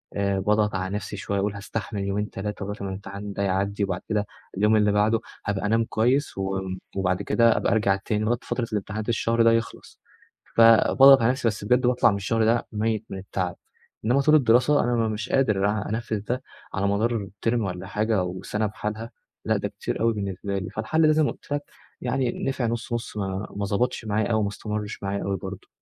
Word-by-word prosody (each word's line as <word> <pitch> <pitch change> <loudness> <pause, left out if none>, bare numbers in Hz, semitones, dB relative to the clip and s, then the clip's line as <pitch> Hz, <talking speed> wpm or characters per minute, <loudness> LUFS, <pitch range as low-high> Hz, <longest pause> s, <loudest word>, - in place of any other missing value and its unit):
آآ، 100 -1 0
باضغط 105 +1 +1
على 95 +1 -2
نفسي 105 0 -5
شوية 100 +1 -2
وأقول 100 +1 0
هاستحمل 105 0 -4
يومين 100 +2 -1
3 105 0 -5
لغاية 105 +1 -5
ما 100 - -3
الامتحان 100 +1 -6
ده 100 - -2
يعدي 100 +2 0
وبعد 95 -2 -2
كده 105 -2 +1 0.3
اليوم 105 +2 +4
اللي 105 -1 +4
بعده 105 +2 +3 0.3
هابقى 100 -1 -1
أنام 115 +2 +2
كويس 125 +5 +1
و 95 0 -1 0.4
وبعد 90 -1 +1
كده 115 -1 +3
أبقى - - +1
أرجع 105 -3 +3
تاني 105 +2 -2
لغاية 120 +2 +2
فترة 120 -2 -3
الامتحانات 105 +2 -3
الشهر 115 0 +2
ده 115 - +6
يخلص 115 0 -3 0.6
فباضغط 115 +4 +7
على 115 +2 +4
نفسي 130 -2 -1
بس 110 -2 -2
بجد 125 +4 +3
باطلع 125 -2 +4
من 100 - -1
الشهر 110 +3 +1
ده 115 +1 +2
ميّت 110 0 -1
من 95 - -5
التعب، 95 -2 -3 0.5
إنما 125 +5 +3
طول 150 +2 +5
الدراسة 125 +1 +4
أنا 120 -2 +1
مش 105 0 -4
قادر 105 -7 +2
أ 105 -1 -2
أنفذ 110 -1 -2
ده 125 +5 -3 0.3
على 100 +1 0
مدار 105 +1 0 0.2
term - - +1
والّا 95 -3 -4
حاجة 105 0 0
وسنة 95 +4 -3
بحالها 110 +2 -5 0.3
لأ - - +2
ده - - -2
كتير - - -4
أوي 115 0 +3
بالنسبة 100 -1 -3
لي، 95 - -5
فالحلّ 155 +9 +1
ده - - +5
زي 155 0 +3
ما - - +1
قُلت - - -16
لك 145 0 -1 0.4
يعني 125 -1 0
نفع 130 -2 -1
نُص 115 +1 -3
نُص 115 -2 -4
ما 95 0 -3
ما 100 0 -2
ضبطش 115 +4 -1
معايا 105 0 0
أوي 110 -1 +2
ما - - 0
استمرش 105 0 -5
معايا 100 0 -2
أوي 100 0 -1
برضه. 95 +1 -8
105 Hz, 205 wpm, -25 LUFS, 100-115 Hz, 0.6 s, فباضغط